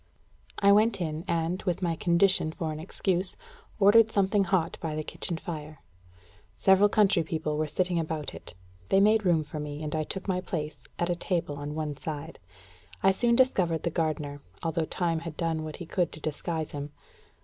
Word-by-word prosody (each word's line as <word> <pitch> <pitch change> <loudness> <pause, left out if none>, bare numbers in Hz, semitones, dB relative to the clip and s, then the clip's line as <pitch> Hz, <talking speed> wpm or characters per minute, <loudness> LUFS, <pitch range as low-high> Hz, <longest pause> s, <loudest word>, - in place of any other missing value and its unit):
I 200 0 +5
went 215 +2 +4
in, 160 -2 -3
and, 170 +2 0
with 180 0 -2
my 170 -2 +1
condition 170 0 +3
for 160 -1 -3
an 155 - -5
excuse, 185 +2 -1 0.4
ordered 215 +2 +7
something 200 -1 +2
hot 170 -2 0
by 155 -2 -3
the 155 - -2
kitchen 170 +2 -4
fire. 155 -4 -7 0.7
Several 190 - +5
country 205 -4 +4
people 155 -1 -2
were 155 +1 0
sitting 180 +2 0
about 155 -2 -3
it. - - -11 0.3
They 195 - +5
made 215 +1 +4
room 165 -3 +3
for 150 +1 -7
me, 150 0 -5
and 150 - -3
I 155 - +1
took 190 +6 -5
my 185 -1 0
place 155 -4 -5
at 175 0 0
a - - +1
table 170 -4 -2
on 145 +1 -5
one 155 -2 -3
side. 155 +1 -6 0.6
I 195 - +6
soon 235 +5 +2
discovered 185 -11 +2
the 170 - 0
gardener, 150 -3 -2 0.2
although 165 0 0
time 165 0 -1
had 165 -2 -7
done 165 -2 -1
what 155 -1 -6
he 175 - -7
could 175 0 0
to - - -9
disguise 155 +1 -3
him. 145 0 -5
165 Hz, 190 wpm, -28 LUFS, 155-190 Hz, 0.7 s, ordered